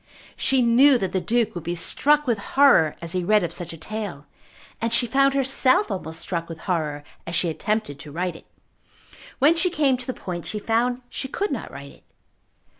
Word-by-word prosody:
She 265 -2 +2
knew 255 +4 +5
that 190 -5 -3
the 185 - -1
Duke 225 +4 0
would 175 - -6
be 170 +1 -3
struck 295 - +2
with 235 -5 0
horror 265 - +4
as 165 - -5
he 180 0 -1
read 210 +2 +3
of 170 -1 -3
such 175 0 -6
a 165 - -9
tale, 190 -5 -6 0.6
and 230 0 -1
she 235 +1 +3
found 275 +3 +2
herself 260 -4 +2
almost 160 -4 -4
struck 170 -2 -3
with 165 -1 -8
horror 155 -5 -2 0.2
as 170 - -2
she 170 - +2
attempted 210 -5 -2
to 145 +1 -10
write 175 +2 -3
it. - - -15 0.9
When 295 +5 +4
she 365 +2 +1
came 290 -6 +1
to 250 - -8
the 255 - -3
point 175 -2 -6
she 215 - -4
found 240 +4 0
she 265 - -5
could 405 +9 -3
not - - -4
write - - -10
it. - - -21
215 Hz, 205 wpm, -23 LUFS, 170-255 Hz, 0.9 s, knew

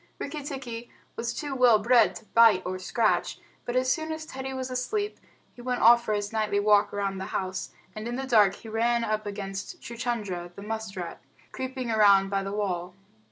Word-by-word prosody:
Rikki 295 +1 -5
tikki 255 -4 -6 0.2
was 230 +1 -2
too 285 +3 -4
well 250 -4 +6
bred 235 +2 +4
to 220 - -10
bite 220 -5 +5
or 185 +1 -3
scratch, 215 +4 0 0.3
but 240 - -3
as 255 0 +2
soon 315 +2 -1
as 315 0 -5
Teddy 265 -2 -6
was 260 -1 -4
asleep 410 +12 -2 0.3
he 245 - -12
went 250 0 -2
off 235 +1 +7
for 215 - -1
his 205 +1 -3
nightly 210 -2 +1
walk 205 0 +4
round 195 -1 -2
the - - -3
house, 185 0 -4 0.3
and 215 +1 -5
in 240 - -3
the 270 +1 -3
dark 210 -6 +4
he - - -13
ran 235 +2 +1
up 215 -1 -1
against 200 - -5
Chuchundra, 215 -7 -4
the 200 - -9
musk 220 -1 -5
rat, 175 -2 -6 0.3
creeping 260 -2 -4
around 200 -3 +5
by 195 0 +1
the 195 0 -4
wall. 185 -3 -2
225 Hz, 200 wpm, -27 LUFS, 200-250 Hz, 0.3 s, off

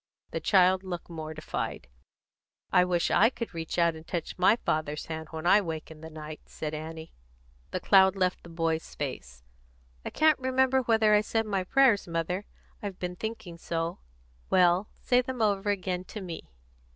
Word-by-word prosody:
The - - -2
child 185 -1 +4
looked 175 -2 -6
mortified. 155 - -5 0.8
"I 180 - +6
wish 180 -1 +1
I 225 - +5
could 235 -5 -6
reach 165 0 -4
out 170 -1 +3
and 160 0 -12
touch 170 -3 -4
my 185 +4 +5
father's 155 -8 -2
hand 160 0 -6
when 160 0 -6
I 200 +4 +6
wake 160 -4 -5
in 155 -1 -12
the 160 - -8
night," 155 -1 -8
said 155 0 -5
Annie. 160 +1 -7 0.6
The - - -3
cloud 190 -1 +5
left 185 -1 0
the 170 - -13
boy's 165 -1 -2
face. - - -6 0.6
"I - - -4
can't 310 -2 +3
remember 260 0 +2
whether 220 -3 +3
I 210 - +6
said 225 +1 -1
my 195 -3 -1
prayers, 240 -1 +3
mother, 170 +4 -2 0.4
I've 200 -3 -5
been 180 0 -4
thinking 195 -5 -6
so." 165 0 -3 0.5
"Well, 180 +2 +4
say 250 0 +4
them 255 0 -6
over 205 -2 +1
again, 185 -2 -1
to 215 - -7
me." 170 - -7
180 Hz, 175 wpm, -28 LUFS, 160-210 Hz, 0.8 s, I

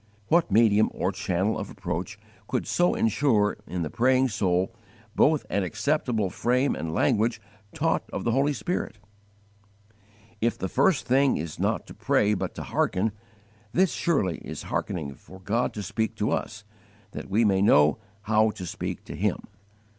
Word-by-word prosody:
What 170 -3 +3
medium 110 0 +4
or 90 - 0
channel 95 +1 -1
of - - -5
approach - - -5 0.3
could - - -1
so 175 0 +2
insure 110 -2 +2
in 90 -1 -3
the 75 - -3
praying 130 +2 +3
soul 95 -1 0 0.4
both 155 0 +3
an 100 - 0
acceptable 110 - 0
frame 125 +3 +1
and 80 +1 -4
language 110 +7 +1 0.3
taught - - -1
of - - -4
the 115 - +1
Holy 135 +4 +2
Spirit? 115 - -3 1.4
If 115 +1 +1
the 95 - -3
first 155 - +2
thing 135 +2 +3
is 80 0 -6
not - - 0
to - - -11
pray 105 +1 +2
but 100 - -3
to - - -5
hearken, 100 +4 0 0.6
this 185 0 +3
surely 105 - 0
is - - -7
hearkening 75 -6 -3
for 95 +7 -15
God 110 +6 0
to 105 - -4
speak 110 +4 -2
to 105 -1 -1
us 105 -1 -3 0.5
that - - -7
we 110 +4 +3
may 95 -2 +3
know 75 -7 +5 0.2
how 110 0 +3
to 95 -3 -6
speak 85 - -5
to - - -8
Him. - - 0
110 Hz, 160 wpm, -26 LUFS, 95-125 Hz, 1.4 s, know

